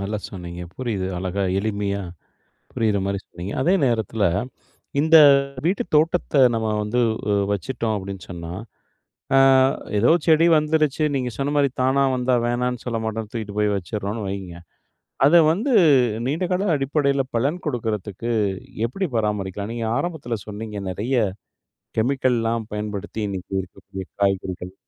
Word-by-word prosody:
நல்லா 105 +2 -3
சொன்னீங்க. 90 -2 -7
புரியுது. 110 -7 -2
அழகா 95 +2 -2 0.2
எளிமையா 100 -1 -2 0.7
புரியற 110 -3 +1
மாரி 100 0 -1
சொன்னீங்க. 90 +3 -7
அதே 175 +7 +3
நேரத்துல 110 -3 0 0.8
இந்த 160 +2 +6 0.5
வீட்டுத் 205 +7 -1
தோட்டத்த 165 +3 +2 0.2
நம்ம 110 -1 -1
வந்து 110 +4 0 0.3
உ - - +3 0.2
வச்சுட்டோம் 110 +2 -2
அப்டின்னு 95 -1 -7
சொன்னா, 85 -1 -6 0.9
அ - - +7 0.6
ஏதோ 115 - +5
செடி 160 0 +5
வந்துருச்சு. 155 -1 +1
நீங்கச் 125 -3 -3
சொன்ன 140 +1 -1
மாரி, 140 -1 +3
தானா 130 +2 +3
வந்தா 125 0 +1
வேணாம்னு 125 0 -1
சொல்லமாட்டோம். 110 -2 -3
தூக்கிட்டு 105 -3 -5
போய் 105 -1 +2
வச்சிட்றோன்னு 100 +3 -4
வைங்க. 95 -3 -5 0.7
அத 150 +5 +5 0.2
வந்து 215 - -1 0.5
நீண்ட 155 +8 -1
கால 185 +3 +1
அடிப்படையில 140 0 +1
பலன் 140 +9 0
குடுக்கறதுக்கு 110 - -3 0.6
எப்படி 190 +11 -3
பராமரிக்கலாம்? 105 -1 -2
நீங்க 115 -1 -3
ஆரம்பத்துல 150 -10 -3
சொன்னீங்க 105 0 -6
நிறைய 115 +8 -2 0.8
கெமிக்கல்லாம் 115 -2 +1
பயன்படுத்தி 105 0 -4
இன்னைக்கு 95 -1 -6
இருக்கக்கூடிய 95 +1 -9 0.2
காய்கறிகள் 95 -2 -1
110 Hz, 125 wpm, -22 LUFS, 100-135 Hz, 0.9 s, அ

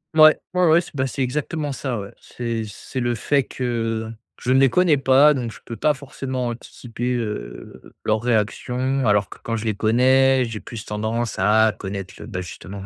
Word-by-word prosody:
Ouais, 155 0 +8 0.2
ouais, 180 0 +3
ouais 165 +2 +5
c'est 170 - -13
bah, 130 -1 0
c'est 135 +1 -4
exactement 150 +3 -2
ça, 130 -5 -3
ouais. 100 0 -8
C'est 115 -2 -4
c'est 105 +5 -7
le 120 0 +1
fait 140 +4 +1
que 115 -3 -2 0.3
je 125 - -1
ne 135 - +5
les 135 0 +5
connais 175 +3 +4
pas, 135 +3 +5
donc 125 -4 -3
je - - -13
peux 115 - -6
pas 150 +6 +2
forcément 130 -2 -4
anticiper, 120 +1 -5
heu, 65 - -5 0.2
leurs 110 0 +1
réactions. 125 +3 0
Alors 105 -1 +2
que - - -11
quand 115 0 -2
je 110 - -5
les 110 -2 0
connais, 130 +4 +4
j'ai 115 -2 -5
plus 115 -1 -8
tendance 110 +2 -2
à 110 +2 +4
connaître 95 -1 -6
le - - -8
bah 100 -6 -5
justement, 95 +2 -8
120 Hz, 195 wpm, -22 LUFS, 110-135 Hz, 0.3 s, Ouais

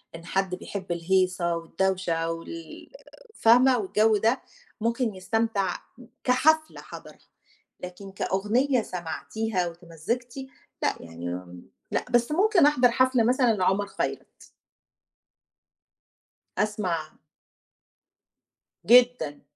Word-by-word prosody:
إن 165 0 -11
حد 190 0 -1
بيحب 190 0 -7
الهيصة 175 0 +1
والدوشة 165 -1 -1
وال 330 - -9 0.5
فاهمة؟ 245 +3 +5
والجَو 215 +1 +2
ده 230 +5 +1 0.4
ممكن 230 -1 0
يستمتع 200 0 -1 0.5
كحفلة 315 +5 +2
حضَرها، - - -13 0.5
لكن 180 +2 -9
كأغنية 230 +8 0
سمعتيها 185 +2 -3
واتمزِّجتِ، 175 +8 -5 0.5
لأ - - +1
يعني 85 +1 -10
م 90 -1 -10 0.2
لأ، - - -1
بس 240 +2 +2
ممكن 365 0 +4
أحضَر 250 -5 +4
حفلة 255 -1 +3
مثلًا 250 +1 +3
لعمر 195 0 +1
خيرت. - - -5 2.1
أسمَع 210 -6 -1 1.8
جدًا. 240 -12 +4
205 Hz, 90 wpm, -26 LUFS, 175-245 Hz, 2.1 s, فاهمة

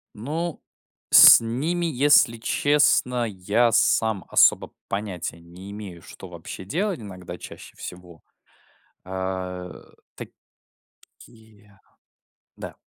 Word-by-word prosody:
Ну, 155 +9 -5 0.5
с - - +9
ними, 155 +10 -2
если 145 -4 +3
честно, 125 -1 +1
я 105 +3 0
сам 110 -4 +1
особо - - +3 0.2
понятия 95 -5 -5
не 90 +4 -13
имею, 100 -5 -10
что 95 - -12
вообще 85 +2 -10
делать 185 - -2
иногда 90 -4 -10
чаще - - -12
всего. 90 -3 -11 0.8
А 95 -1 -5 0.4
та - - -9 0.9
кие 105 -3 -20 0.8
да. - - -9
105 Hz, 100 wpm, -23 LUFS, 90-125 Hz, 0.9 s, с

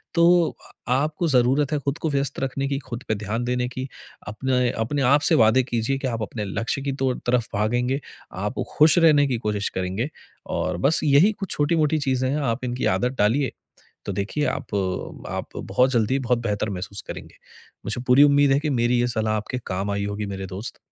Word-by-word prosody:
तो 170 0 +5
अ, - - -17 0.2
आपको 155 +5 0
ज़रूरत 130 +2 +3
है, 150 - +1
खुद 140 +2 -2
को 160 - -1
व्यस्त 140 0 -1
रखने 135 +1 -2
की, 140 - -1
खुद 120 +1 -5
पे 110 - +2
ध्यान 105 +3 -3
देने 125 0 0
की, 130 +1 -5 0.4
अपने 125 +3 0
अपने, 120 +6 -2
आप 140 +3 +4
से - - +6
वादे 130 +4 +4
कीजिए 120 +2 -1
कि 135 - -2
आप 115 -2 -3
अपने 105 0 -4
लक्ष्य 115 +7 -2
की 140 - -1
तोर 130 -1 +1
तरफ़ 120 -1 +2
भागेंगे, 120 +6 0 0.3
आप 105 +6 -3
खुश 155 +2 +6
रहने 150 -3 +5
की 125 -3 -1
कोशिश 105 -1 -1
करेंगे। 95 +9 -2 0.5
और - - -1
बस 160 - +4
यही 150 +7 +5
कुछ 195 -3 -7
छोटी-मोटी 155 +1 +2
चीज़ें 130 0 +1
हैं। 145 - 0 0.2
आप 125 - -8
इनकी 125 +1 -2
आदत 125 +2 -2
डालिए। 120 +5 +2 0.5
तो - - -2
देखिए, 105 +10 -2
आप 110 - -3 0.6
आप - - -3
बहुत 130 +1 +1
जल्दी, 120 +1 +2
बहुत 125 -2 +1
बेहतर 105 -2 -2
महसूस 100 +1 -4
करेंगे। - - -8 0.5
मुझे 120 - -3
पूरी 130 +3 +7
उम्मीद 145 -1 +5
है 135 - +4
कि 150 +1 -2
मेरी 120 -2 +2
ये 120 - +1
सलाह 110 -2 0
आपके 110 +4 -3
काम 95 +2 -2
आई 100 0 -1
होगी 105 +1 -3
मेरे 95 -1 -5
दोस्त। 100 +6 -7
125 Hz, 200 wpm, -23 LUFS, 110-140 Hz, 0.6 s, पूरी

